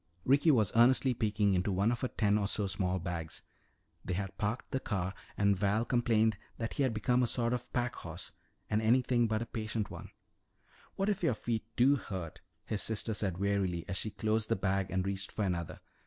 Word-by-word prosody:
Ricky 140 Hz, +5 st, +4 dB
was 110 Hz, -9 st, +4 dB
earnestly 125 Hz, +2 st, +5 dB
peeking 105 Hz, -3 st, +1 dB
into 90 Hz, +2 st, +1 dB
one 100 Hz, +4 st, +2 dB
of 120 Hz, -, -2 dB
her 130 Hz, -, +1 dB
ten 105 Hz, -4 st, +1 dB
or 105 Hz, -1 st, +1 dB
so 105 Hz, 0 st, 0 dB
small 95 Hz, -1 st, 0 dB
bags. 85 Hz, -2 st, -5 dB, 0.6 s
They 90 Hz, -, -2 dB
had 95 Hz, 0 st, -4 dB
parked 110 Hz, +4 st, -3 dB
the 130 Hz, -, 0 dB
car 95 Hz, -6 st, -2 dB, 0.2 s
and 100 Hz, 0 st, +3 dB
Val 105 Hz, +4 st, +1 dB
complained 115 Hz, -4 st, +2 dB, 0.2 s
that 115 Hz, 0 st, -3 dB
he -, -, -2 dB
had 130 Hz, -3 st, +3 dB
become 120 Hz, +3 st, +1 dB
a 125 Hz, -, +2 dB
sort 120 Hz, 0 st, +1 dB
of 125 Hz, 0 st, -4 dB
packhorse, 95 Hz, -8 st, -3 dB, 0.4 s
and 105 Hz, +1 st, +1 dB
anything 120 Hz, +1 st, +3 dB
but 110 Hz, +1 st, -2 dB
patient 110 Hz, -1 st, -3 dB
one. -, -, -8 dB, 0.9 s
"What 195 Hz, -, 0 dB
if 205 Hz, -, 0 dB
your 160 Hz, -9 st, +2 dB
feet 110 Hz, -1 st, -2 dB
do 135 Hz, +4 st, +5 dB
hurt," 90 Hz, -, -6 dB, 0.2 s
his 105 Hz, -2 st, -2 dB
sister 110 Hz, 0 st, -1 dB
said 95 Hz, -4 st, -1 dB
wearily 95 Hz, -3 st, 0 dB
as 95 Hz, -, -2 dB
she 110 Hz, -, -1 dB
closed 110 Hz, +1 st, -1 dB
the 115 Hz, -, +3 dB
bag 95 Hz, -1 st, 0 dB
and 95 Hz, 0 st, -1 dB
reached 100 Hz, 0 st, -3 dB
for 110 Hz, -, -2 dB
another. 85 Hz, -3 st, -3 dB
110 Hz, 200 wpm, -32 LUFS, 95-120 Hz, 0.9 s, earnestly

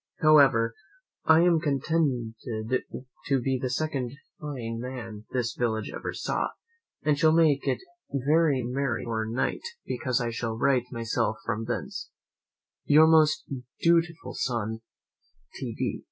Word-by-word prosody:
However, 135 Hz, -7 st, +6 dB, 0.5 s
I 160 Hz, +1 st, +6 dB
am 175 Hz, -2 st, +4 dB
contented 140 Hz, -5 st, 0 dB, 0.9 s
to 135 Hz, -1 st, +2 dB
be 130 Hz, +1 st, 0 dB
the 130 Hz, -, -1 dB
second 130 Hz, -2 st, -2 dB, 0.3 s
fine 120 Hz, -6 st, -5 dB
man 115 Hz, -4 st, -7 dB
this 120 Hz, -3 st, -1 dB
village 110 Hz, -3 st, -1 dB
ever -, -, -4 dB
saw, -, -, -1 dB, 0.6 s
and 150 Hz, -2 st, +2 dB
shall 155 Hz, 0 st, +5 dB
make 155 Hz, -4 st, +3 dB
it -, -, +2 dB, 0.3 s
very 140 Hz, 0 st, +2 dB
merry 125 Hz, -1 st, -1 dB
before 110 Hz, -2 st, -2 dB
night, 120 Hz, +4 st, -1 dB, 0.2 s
because 125 Hz, 0 st, -1 dB
I 120 Hz, -2 st, -1 dB
shall 115 Hz, -1 st, -3 dB
write 125 Hz, 0 st, +2 dB
myself 115 Hz, -2 st, -1 dB
from 115 Hz, 0 st, -2 dB
thence, 120 Hz, -, -4 dB, 0.8 s
"Your 155 Hz, +2 st, +7 dB
most 160 Hz, -1 st, +4 dB, 0.3 s
dutiful 165 Hz, -1 st, +2 dB
son, 110 Hz, -3 st, -2 dB, 0.7 s
"T. -, -, -5 dB
D. -, -, -2 dB
130 Hz, 130 wpm, -27 LUFS, 115-155 Hz, 0.9 s, Your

